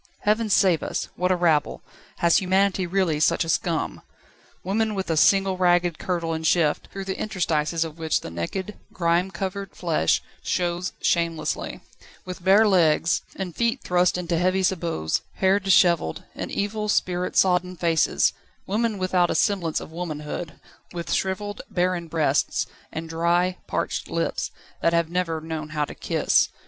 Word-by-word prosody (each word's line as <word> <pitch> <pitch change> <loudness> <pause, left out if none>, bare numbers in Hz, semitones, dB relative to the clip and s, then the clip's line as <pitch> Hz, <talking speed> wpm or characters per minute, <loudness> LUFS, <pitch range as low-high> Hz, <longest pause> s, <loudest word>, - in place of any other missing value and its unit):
Heaven 215 +1 +1
save 185 -5 +4
us! - - -3
What 180 +1 0
a - - +4
rabble! 165 -4 +1 0.3
Has 170 -1 +4
humanity 190 -1 +2
really 175 -4 +1
such 155 - +3
a - - -6
scum? 165 0 -1 0.6
Women 215 +3 0
with 190 -3 -2
a - - +1
single 195 +3 +4
ragged 175 -2 +2
kirtle 170 -3 -2
and 160 0 -4
shift, 160 -2 +2
through 195 0 -6
the 190 0 -4
interstices 165 -5 0
of 165 0 -8
which 160 -1 0
the - - -8
naked, 185 - -4
grime 170 +1 +1
covered 195 0 -5
flesh 160 - +1 0.2
shows 175 0 -1
shamelessly: 165 -2 -1 0.4
with 185 -1 -7
bare 200 +4 +6
legs, 170 -4 +3
and 185 -3 -5
feet 235 +2 0
thrust 180 0 +2
into 170 -2 -1
heavy 185 +2 +2
sabots, 170 - 0
hair 190 +1 +3
dishevelled, 175 - +3
and - - -5
evil, 210 +1 -2
spirit 180 -2 0
sodden 180 -1 +3
faces: 165 -2 +2 0.3
women 220 +2 0
without 185 -2 +2
a - - 0
semblance 180 -6 +1
of - - -10
womanhood, 160 -1 -5 0.4
with 170 -1 -3
shrivelled, 205 +2 -2
barren 180 -1 0
breasts, 160 -2 +1 0.3
and 165 +1 -5
dry, 170 +3 +1
parched - - -2
lips, - - -1 0.3
that 170 - +2
have 170 -1 +1
never 175 -3 -1
known 155 -1 -5
how 150 -1 -1
to - - -9
kiss. - - +2
175 Hz, 155 wpm, -24 LUFS, 165-190 Hz, 0.6 s, bare